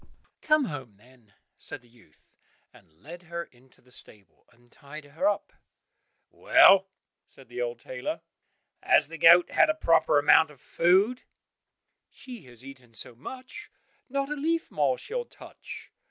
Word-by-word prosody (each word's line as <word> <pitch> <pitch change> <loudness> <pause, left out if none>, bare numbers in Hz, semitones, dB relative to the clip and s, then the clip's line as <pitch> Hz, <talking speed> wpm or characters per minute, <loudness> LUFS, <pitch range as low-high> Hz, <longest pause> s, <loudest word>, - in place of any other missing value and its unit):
meh!" - - -26 0.3
"Come 305 -2 +3
home, 130 - -8
then," 120 -1 -23 0.3
said 135 - -5
the - - -22
youth, 115 -10 -25 0.5
and - - -21
led 155 - -13
her 170 -1 -6
into 130 -3 -24
the 125 - -24
stable, 100 -7 -12
and 120 0 -27
tied 145 +1 -12
her 160 +7 -2
up. 205 0 -4 0.8
"Well," 195 0 +5 0.4
said 135 -3 -19
the 125 0 -5
old 120 -1 -3
tailor, 125 +1 -6 0.6
"has - - +3
the 165 -1 -9
goat 170 +3 +7
had 325 - +4
a 310 - +1
proper 165 - +3
amount 150 +2 +5
of 145 -3 -17
food?" 195 - +2 0.9
"She 250 -5 -11
has 125 0 -11
eaten 130 -4 -14
so 110 - -5
much, 255 - -10 0.4
not 275 +2 -2
a - - -1
leaf 325 +3 -2
more 140 -4 +1
she'll 485 +2 -4
touch." - - -12
150 Hz, 155 wpm, -27 LUFS, 125-200 Hz, 0.9 s, goat